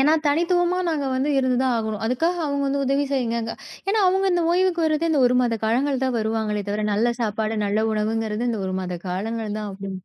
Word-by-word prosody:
ஏன்னா 300 +4 +5
தனித்துவமா 350 +4 +2
நாங்க 295 -4 -1
வந்து 265 +3 0
இருந்து 255 -2 +1
தான் 255 -2 +2
ஆகணும். 220 -2 -3
அதுக்காக 330 +9 0
அவுங்க 280 -1 -1
வந்து, 280 0 0
உதவி 275 +2 +2
செய்யுங்கங்க 235 -3 -1 0.4
ஏன்னா 425 +2 +2
அவங்க 385 +1 +2
அந்த 350 -1 +2
ஓய்வுக்கு 360 -1 +2
வர்றதே 310 +1 +1
இந்த 280 - +3
ஒரு 250 - +2
மாத 230 -2 0
காலங்கள் 265 +4 +1
தான் 255 -2 0
வருவாங்களே 215 -1 -1
தவிர, 210 +1 -1
நல்ல 235 +3 +1
சாப்பாடு, 220 0 -1
நல்ல 215 +2 +1
உணவுங்கிறது, 215 +1 -1
இந்த 220 -3 -2
ஒரு 185 - -3
மாத 180 -1 -4
காலங்கள் 215 +3 -3
தான். 210 -1 -4
அப்படி 195 0 -7
240 Hz, 205 wpm, -23 LUFS, 215-290 Hz, 0.4 s, ஏன்னா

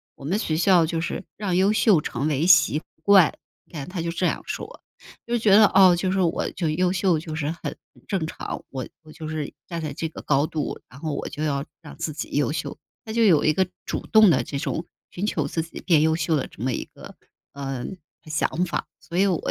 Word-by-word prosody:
“我 135 - -11
们 185 +8 0
学 155 -8 -1
校 175 -1 +5
就 165 0 -2
是 170 - -3
让 195 -4 -1
优 190 +3 +4
秀 210 -7 +4
成 135 0 -2
为 155 +3 +1
习 155 -3 +5 0.2
惯。” 195 -5 +6 0.3
你 - - -29
看， 145 0 -6
他 180 -2 -4
就 170 - -2
这 175 +2 -1
样 - - 0
说， - - -6 0.5
就 235 - -3
是 240 - +2
觉 220 -2 +3
得 215 +1 +8
哦， 190 -3 +6
就 185 +1 -1
是 190 0 +1
我 170 -1 0
就 170 -3 -2
优 180 +4 +1
秀 185 -3 +2
就 155 -1 -6
是 150 -1 -1
很 170 - -6 0.3
正 190 -5 -1
常， 160 - -6
我 130 -2 -5 0.2
我 155 - -14
就 160 0 -8
是 155 -2 -4
站 170 -2 -4
在 155 -3 -4
这 160 +3 -3
个 - - -9
高 145 +1 +2
度， 155 -2 -3
然 130 - -13
后 155 -1 -3
我 - - -3
就 150 - -5
要 140 -2 0 0.2
让 - - -10
自 155 - -3
己 150 - -5
优 145 - +2
秀。 145 -2 -4 0.3
他 220 - -6
就 230 0 +3
有 175 -8 +5
一 155 - +4
个 190 +3 +1 0.2
主 - - -4
动 220 -4 +7
地 - - +3
这 140 - -5
种 160 +4 -3 0.3
寻 185 - -3
求 155 -8 0
自 165 - -2
己 165 - -9
变 165 -5 +4
优 160 +1 +3
秀 165 -1 0
的 135 - -1
这 110 - -10
么 130 - +1
一 - - -3
个， - - -13 0.4
呃， 135 -3 -4 0.4
想 155 +3 0
法， 175 - -3
所 170 - -7
以 195 - +5
我 180 -4 +2
165 Hz, 260 characters per minute, -24 LUFS, 150-185 Hz, 0.5 s, 得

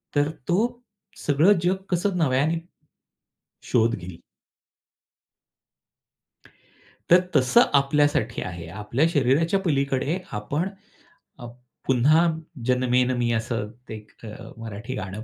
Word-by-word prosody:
तर 145 +1 +2 0.2
तो 175 - +2 0.6
सगळं 150 +8 +4
जग 180 +2 +2 0.2
कसं 180 +1 0
नव्याने 155 +2 +1 1.1
शोध 115 0 +3
घेईल. 90 -2 -9 2.9
तर 175 +2 +8 0.2
तसं 125 -1 +5
आपल्यासाठी 140 -4 +2
आहे. 85 -2 -6
आपल्या 105 - -1
शरीराच्या 160 +5 +2
पलीकडे 140 -1 0
आपण 140 - -2 0.7
अप 120 0 -10 0.3
"पुन्हा 150 +7 +4 0.4
जन्मेन 125 0 +2
मी" 120 -1 0
असं 110 -2 -2 0.2
ते 110 - -5
एक 105 0 -13
अ, 105 - -9
मराठी 115 +2 -7
गाणं 100 +1 -6
130 Hz, 100 wpm, -24 LUFS, 115-155 Hz, 2.9 s, तर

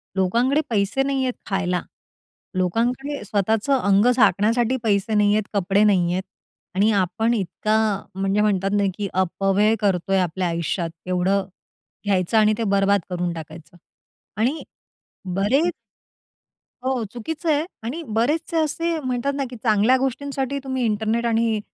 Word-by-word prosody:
लोकांकडे 235 +10 +2
पैसे 205 +4 +1
नाहीयेत 265 -2 0 0.2
खायला, 180 -3 0 0.8
लोकांकडे 240 +9 -1
स्वतःचं 220 +7 +1
अंग 200 -1 +3
झाकण्यासाठी 230 +3 +3
पैसे 205 0 +1
नाहीयेत, 210 +1 +3
कपडे 200 +1 +2
नाहीयेत 185 -3 +2 0.5
आणि 205 +3 +3
आपण 195 +6 0
इतका 215 +1 0 0.4
म्हणजे 195 +2 +1
म्हणतात 195 -2 +1
ना, 205 - +2
की 205 -1 -2
अपव्यय 195 +3 +2
करतोय 195 -1 +1
आपल्या 180 0 -1
आयुष्यात. 170 +1 -2 0.2
एवढं 185 +2 +1 0.6
घ्यायचं, 195 +1 +1
आणि 215 0 +5
ते 230 - -1
बरबाद 200 0 +3
करून 175 -1 -2
टाकायचं 160 +1 -10 0.6
आणि 255 +8 0 0.7
बरेच 270 - +2 1.1
हो 260 -2 0
चुकीचं 310 +7 -4
आहे 300 +1 +1 0.2
आणि 260 +9 -4
बरेचसे 300 +9 0
असे 330 +2 0
म्हणतात 255 0 -2
ना 280 - -1
की 250 - -9
चांगल्या 220 +2 +4
गोष्टींसाठी 270 +1 -2
तुम्ही 260 -1 -2
इंटरनेट 220 +2 0
आणि, 225 -1 +1
215 Hz, 125 wpm, -22 LUFS, 195-255 Hz, 1.1 s, आणि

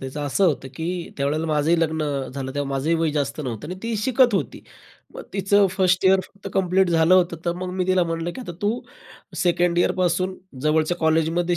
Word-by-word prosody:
त्याचं 135 +2 -6
असं 170 +8 +1
होतं, 135 -5 -1
की 170 +3 -4
त्यावेळेला 145 +3 -1
माझंही 155 +2 +2
लग्न 160 -1 0 0.3
झालं, 135 -1 -4
तेव्हा 145 -1 -2
माझंही 135 +5 0
वय 160 -1 +1
जास्त 145 0 -2
नव्हतं 125 -2 -5
आणि 180 - -4
ती 230 0 -2
शिकत 245 +1 +3
होती. 150 - -2 0.5
मग - - -7
तिचं 200 +1 +3
1st 185 -1 +1
इयर 190 0 +5
फक्त 200 0 -11
कंप्लीट 190 0 +2
झालं 165 +2 +4
होतं, 175 -2 +3
तर 170 - +1
मग 180 0 -4
मी 185 -1 -1
तिला 185 -1 +3
म्हणलं, 165 0 -3
की - - -7
"आता 205 -8 -7
तू 220 +4 0 0.6
2nd 175 -1 +2
इयरपासून 185 +1 +1 0.3
जवळच्या 155 +3 +1
कॉलेजमध्ये 165 +2 +1
170 Hz, 190 wpm, -23 LUFS, 155-185 Hz, 0.6 s, इयर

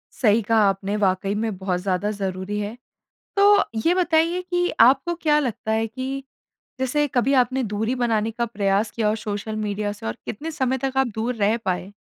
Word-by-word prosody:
सही 225 -2 +3
कहा 225 +2 +2
आपने, 195 +1 -1
वाक़ई 195 0 +1
में 215 -2 -2
बहुत 185 -2 -1
ज़्यादा 190 +2 -1
ज़रूरी 195 0 -3
है। 210 +3 -4 0.6
तो 405 0 +6 0.2
ये 340 - +5
बताइए 340 0 +2
कि 355 0 0
आपको 270 +8 +5
क्या 300 -1 +3
लगता 235 -5 -3
है 225 +1 +1
कि 265 +4 -5 0.6
जैसे 290 +3 +1
कभी 260 +1 +1
आपने 260 0 +2
दूरी 220 +3 -1
बनाने 225 -3 0
का 235 +1 -2
प्रयास 205 -1 0
किया 220 -2 -1
हो 215 - +1
सोशल 210 0 -4
मीडिया 210 -1 -2
से 205 - -10
और 110 +1 -3
कितने 310 +10 -5
समय 260 -4 0
तक 265 +1 -3
आप 265 -1 +3
दूर 230 +3 -1
रह 215 +2 +2
पाए? 185 +1 -2
225 Hz, 190 wpm, -23 LUFS, 205-265 Hz, 0.6 s, तो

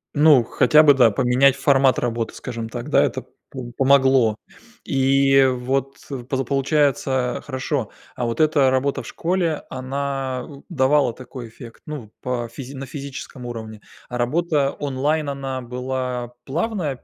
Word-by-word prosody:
Ну, 145 -4 +6
хотя 150 +6 +4
бы, 145 -2 +7
да, 125 -4 +5
поменять 130 +4 +3
формат 135 -2 +3
работы, 115 -2 -2
скажем 115 -1 -6
так, 120 +5 -6
да. - - +4
Это - - -2 0.2
по 125 -2 -7
помогло. 135 -4 +4 0.5
И 135 0 +4
вот, 130 +2 -1 0.3
поза 135 -1 0
получается 135 -2 0
хорошо 130 -3 -2 0.3
А 120 - -2
вот 115 0 -3
эта 150 -4 +4
работа 135 +2 0
в - - -11
школе, 170 -3 -1
она 130 -1 -3
н 140 -2 -12
давала 140 -5 +2
какой 125 0 -9
эффект, 115 0 -13
ну, 135 -9 -7
по 125 -2 -2
физи 135 +3 -9
на 135 +1 -6
физическом 135 -3 -8
уровне. 110 -3 -7 0.3
А 125 - -4
работа 145 +2 +1
онлайн, 145 +2 -1
она 135 -2 -4
была 125 0 -4
плавная 160 - -2
135 Hz, 145 wpm, -22 LUFS, 125-140 Hz, 0.5 s, бы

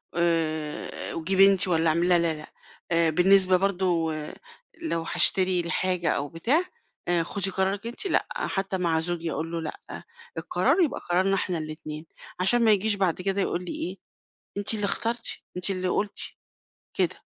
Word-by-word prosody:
آآ 160 -3 -1
وجيبي 190 +4 +4
أنتِ 195 -1 +3
والّا 165 -2 +2
اعملي." 170 +3 +2
لا، 175 -1 +6
لا، 170 -1 +1
لأ. 155 0 -10 0.4
آآ 165 -1 +3
بالنسبة 185 +3 +5
برضه 180 -4 0 0.7
لو 240 - -1
هاشتري 185 -1 +4
الحاجة 175 0 0
أو 145 - 0
بتاع، 235 - +1 0.4
آآ 175 -1 +2
"خُدي 195 +2 -2
قرارِك 195 +4 -1
أنتِ" 240 - -5
لأ، - - +1
حتّى 195 -1 -2
مع 170 -3 +1
زوجي 170 -1 -3
أقول 165 +1 -4
له: 170 -1 -3
"لأ، 155 - -8 0.3
القرار 375 - +1
يبقى 315 - +1
قرارنا 190 +3 +2
إحنا 180 -2 -1
الاتنين." 155 0 -7 0.3
علشان 235 +7 +3
ما 220 - +6
يجيش 210 +1 +2
بعد 185 -3 0
كده 195 +1 0
يقول 180 -1 -2
لي - - -5
إيه، 185 +3 -4 0.6
أنتِ 205 +2 0
اللي 210 - -2
اخترتِ، 230 +3 0 0.3
أنتِ 180 +2 -2
اللي 185 -1 -1
قُلتِ، 200 +3 -1 0.8
كده. - - 0
180 Hz, 160 wpm, -26 LUFS, 165-195 Hz, 0.8 s, لا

